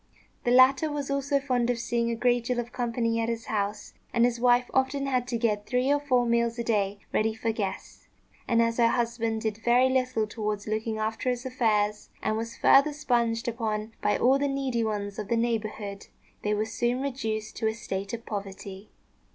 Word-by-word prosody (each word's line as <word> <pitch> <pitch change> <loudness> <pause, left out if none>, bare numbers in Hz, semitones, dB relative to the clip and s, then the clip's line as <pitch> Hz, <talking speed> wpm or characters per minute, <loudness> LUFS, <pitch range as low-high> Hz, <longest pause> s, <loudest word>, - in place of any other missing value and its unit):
The - - +2
latter 265 +4 +5
was 285 -1 -3
also 280 0 +1
fond 250 -3 0
of 245 - +1
seeing 235 0 -1
a 235 - -1
great 240 0 +1
deal 250 0 -1
of 240 0 -4
company 230 -2 -1
at 230 0 0
his 230 -1 -3
house, 205 0 -3 0.2
and 235 0 +4
his 240 -1 0
wife 245 0 +4
often 270 +1 +1
had 255 -2 0
to 245 -2 -1
get 210 -3 0
three 255 +2 +2
or 290 - +2
four 255 -4 +2
meals 235 0 +1
a 235 - -2
day 205 -3 0 0.2
ready 220 0 +1
for 225 0 -1
guests; 205 -3 -5 0.4
and, 230 -1 +4
as 230 0 0
her 235 -1 +5
husband 230 -2 -1
did 220 -1 -2
very 245 +3 +4
little 255 -4 +1
towards 210 -1 -3
looking 220 +1 -2
after 220 +3 -1
his 245 0 -2
affairs, 215 -5 0
and 215 - +1
was 230 +1 -4
further 285 +2 +5
sponged 240 -6 0
upon 220 -2 -2
by 210 - +2
all 265 +2 +4
the 285 - +1
needy 270 -4 -1
ones 205 -2 -3
of 210 - -4
the 235 - +1
neighbourhood, 215 -3 -2 0.3
they 210 0 0
were 215 +1 0
soon 240 +3 -1
reduced 220 -6 -3
to 220 - 0
a 220 - 0
state 195 -3 -4
of 235 0 -6
poverty. 195 -1 -7
230 Hz, 200 wpm, -27 LUFS, 215-250 Hz, 0.4 s, latter